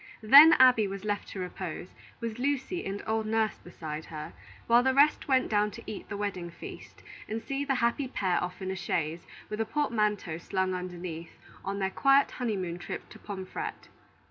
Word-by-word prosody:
Then 285 +8 +10
Abby 250 -5 +6
was 195 +1 -6
left 205 -1 -2
to 195 - -7
repose, 180 -1 -5 0.3
with 230 0 -4
Lucy 285 +6 -1
and 195 +1 -4
old 220 0 -1
Nurse 220 0 0
beside 160 -3 -7
her, 150 - -7 0.3
while 235 +1 +5
the 260 +1 +2
rest 290 +2 +4
went 260 -2 +3
down 210 -1 +2
to - - -10
eat 210 - -7
the 205 - -4
wedding 185 -4 -3
feast 170 - -11 0.2
and 220 +1 -3
see 275 +4 -3
the 275 -1 0
happy 250 +3 +1
pair 190 -8 0
off 180 +2 -5
in 190 - -2
a - - -3
chaise, 165 -2 -2 0.2
with 210 - -5
the 225 - +1
portmanteau 210 - 0
slung 190 +1 -1
underneath, 175 -2 -6 0.3
on 200 0 -3
their 190 -1 -1
quiet 275 +5 +4
honey 230 -5 -2
moon 175 -2 -4
trip - - -6
to - - -13
Pomfret. 200 - -6
205 Hz, 190 wpm, -29 LUFS, 180-245 Hz, 0.3 s, Then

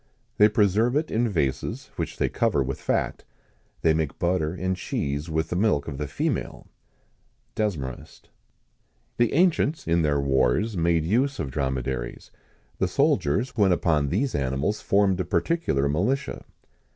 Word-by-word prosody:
They 105 +1 +7
preserve 110 +3 +2
it 155 +2 0
in 115 +1 +1
vases, 70 -8 -2
which - - -4
they - - +1
cover 70 - +1
with 65 +1 -5
fat. - - -1 0.6
They 80 - +4
make 80 -3 -2
butter 85 -3 0
and 95 +1 -2
cheese 70 -3 -3
with 80 0 -1
the - - -2
milk 90 -7 +1
of 70 -3 -5
the 75 - -2
female." 70 - -3 0.9
DESMAREST. 80 - -4 0.9
The 120 -1 +2
ancients, 165 -2 +2
in 85 +1 +3
their 75 -2 +1
wars, 70 - +1
made 85 -2 +1
use 130 +9 +1
of 65 - -4
dromedaries. 65 -3 -3 0.5
The 95 - +2
soldiers 120 - +1
when 100 -5 +3
upon 80 -5 +2
these 125 - 0
animals 70 +9 -1
formed 100 -2 +2
a - - +1
particular 90 - 0
militia. 120 - -1
85 Hz, 145 wpm, -25 LUFS, 70-110 Hz, 0.9 s, They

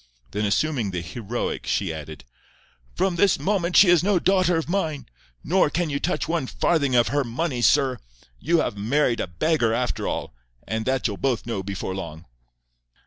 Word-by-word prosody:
Then 105 +1 -1
assuming 120 +1 0
the 90 -2 -3
heroic, 110 +7 -4
she 95 -5 0
added, 80 -2 -8 0.7
"From 185 -3 0
this 195 +2 +4
moment 185 -3 0
she 200 - +8
is 175 -2 +6
no 200 0 +3
daughter 180 -1 +2
of 160 - -2
mine. 165 -5 -2 0.4
Nor 180 -1 +3
can 165 0 -1
you 140 - -1
touch 180 - -1
one 165 -5 -1
farthing 140 -5 +1
of 120 -1 +4
her 145 0 +1
money, 125 +2 -2
sir. 135 0 +3 0.4
You 165 +1 +2
have - - -2
married 120 +3 +1
a - - -2
beggar 115 - +1
after 125 0 -2
all, - - -3 0.3
and 110 +1 -2
that 130 0 0
you'll 105 -5 -1
both 130 -4 -1
know 115 -4 -3
before 95 -1 -4
long." 85 -3 -7
135 Hz, 180 wpm, -24 LUFS, 105-165 Hz, 0.7 s, she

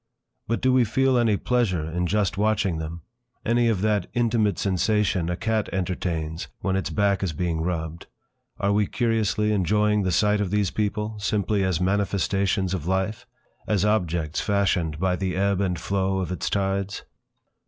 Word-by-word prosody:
But 115 - -1
do 130 0 +3
we 130 -1 +5
feel 130 +4 +2
any 115 -4 +3
pleasure 110 -11 0
in 90 +2 -1
just 100 -2 +1
watching 100 -4 +1
them; 80 +1 -6 0.4
any 120 +1 +3
of 105 -5 0
that 105 -3 +1
intimate 115 -5 +2
sensation 100 -2 +1
a 90 - 0
cat 110 0 -1
entertains 85 -3 -2
when 95 -1 0
its 95 -6 -1
back 100 +3 +1
is 95 -4 -1
being 85 0 -1
rubbed; 80 -1 -3 0.5
are 100 0 +1
we 105 -1 +2
curiously 110 -3 +1
enjoying 105 +2 +2
the 95 -2 0
sight 105 +3 +2
of 100 - -1
these 105 -1 +1
people, 105 0 -2
simply 100 0 0
as 95 -3 0
manifestations 95 0 0
of 85 -4 -3
life, 95 +5 -1 0.4
as 105 -2 +1
objects 85 -6 0
fashioned 95 -6 +1
by 90 +2 +1
the 95 0 -2
ebb 100 0 +1
and 90 -3 -1
flow 95 -1 0
of 90 -2 -2
its 90 - -2
tides? 100 0 -1
100 Hz, 165 wpm, -25 LUFS, 90-105 Hz, 0.5 s, we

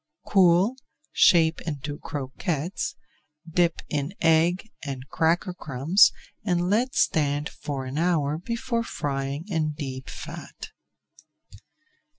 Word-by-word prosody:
Cool, 190 +5 +4 0.3
shape 165 -3 +5
into 145 -1 -5
croquettes, 150 +4 -3 0.5
dip 170 0 +1
in 150 +5 -3
egg 170 +6 +3
and 135 -2 -5
cracker 170 +3 +1
crumbs 155 +4 +4 0.3
and 180 -2 +1
let 245 +5 +1
stand 145 -1 +2
for 135 -3 -5
an 130 +4 -3
hour 160 -3 +1
before 235 +4 -2
frying 140 -2 -3
in 160 -6 -1
deep 135 -3 -6
fat. - - -8
160 Hz, 105 wpm, -26 LUFS, 145-180 Hz, 0.5 s, shape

